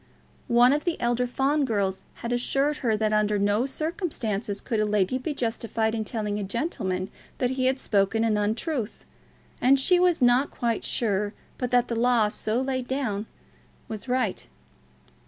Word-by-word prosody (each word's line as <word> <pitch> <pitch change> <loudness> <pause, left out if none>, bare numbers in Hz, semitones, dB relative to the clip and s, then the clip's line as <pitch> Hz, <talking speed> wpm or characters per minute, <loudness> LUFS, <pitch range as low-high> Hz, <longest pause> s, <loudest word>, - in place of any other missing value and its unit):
One 245 +1 +5
of 295 - 0
the 345 -2 -1
elder 240 +1 +1
Fawn 275 +4 +1
girls 200 -6 0 0.2
had 235 - -1
assured 275 +4 +1
her 225 -5 0
that 215 0 0
under 210 0 +2
no 205 +5 +1
circumstances 265 - -3
could 225 - -2
a - - +3
lady 210 +3 +1
be 295 +3 -4
justified 225 -2 -1
in 225 -1 -1
telling 210 -2 -2
a - - -2
gentleman 195 - -2 0.3
that 250 0 0
he 260 -1 +1
had 260 +1 +2
spoken 210 -1 +1
an 225 -2 +2
untruth, 220 +4 -2 0.6
and 270 +2 +5
she 355 +7 +4
was 360 -2 +3
not 250 +3 +4
quite 230 -2 -2
sure 205 -2 0 0.2
but 250 - -1
that 245 0 +3
the 235 - -2
law 235 -2 +3
so 215 +2 -1
laid 260 -1 -2
down 225 -6 -2 0.6
was 220 +2 -6
right. 250 - -1
235 Hz, 170 wpm, -26 LUFS, 210-260 Hz, 0.6 s, One